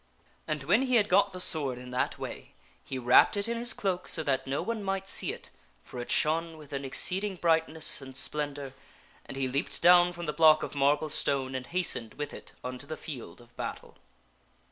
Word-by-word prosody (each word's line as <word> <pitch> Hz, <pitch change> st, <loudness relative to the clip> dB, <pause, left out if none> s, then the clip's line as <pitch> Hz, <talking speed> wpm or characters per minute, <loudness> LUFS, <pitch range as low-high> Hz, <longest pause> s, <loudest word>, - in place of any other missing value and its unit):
And 150 Hz, -3 st, -3 dB
when 190 Hz, -, +3 dB
he 255 Hz, -2 st, +1 dB
had 210 Hz, -3 st, +4 dB
got 200 Hz, +1 st, +3 dB
the 185 Hz, -, -8 dB
sword 145 Hz, -8 st, +2 dB
in 125 Hz, 0 st, -10 dB
that 125 Hz, -, -1 dB
way, -, -, -8 dB, 0.3 s
he 135 Hz, -, -6 dB
wrapped 125 Hz, +10 st, +5 dB
it 200 Hz, -, -1 dB
in 235 Hz, -, -2 dB
his 235 Hz, 0 st, -3 dB
cloak 185 Hz, -3 st, -2 dB
so 160 Hz, -, 0 dB
that 135 Hz, -2 st, -1 dB
no 135 Hz, +1 st, -2 dB
one 230 Hz, -2 st, -3 dB
might 195 Hz, 0 st, -3 dB
see -, -, +1 dB
it -, -, -9 dB, 0.3 s
(for 125 Hz, -, -9 dB
it 120 Hz, -, -6 dB
shone 165 Hz, +1 st, +1 dB
with 150 Hz, -2 st, -13 dB
an 140 Hz, 0 st, -3 dB
exceeding 190 Hz, +9 st, +2 dB
brightness 160 Hz, -3 st, +2 dB
and 130 Hz, -1 st, -8 dB
splendor) 145 Hz, -2 st, -2 dB, 0.5 s
and -, -, -8 dB
he 135 Hz, -1 st, 0 dB
leaped 135 Hz, +2 st, -2 dB
down 175 Hz, 0 st, +6 dB
from 175 Hz, -1 st, -7 dB
the 150 Hz, -, -3 dB
block 155 Hz, 0 st, +5 dB
of -, -, -5 dB
marble 145 Hz, +2 st, +1 dB
stone 135 Hz, -2 st, 0 dB
and 130 Hz, -1 st, -5 dB
hastened 170 Hz, -10 st, 0 dB
with 145 Hz, 0 st, -5 dB
it -, -, -11 dB
unto 125 Hz, +2 st, -6 dB
the 155 Hz, -, -6 dB
field 125 Hz, -, -9 dB
of 120 Hz, 0 st, -21 dB
battle. -, -, -7 dB
155 Hz, 210 wpm, -29 LUFS, 135-180 Hz, 0.5 s, down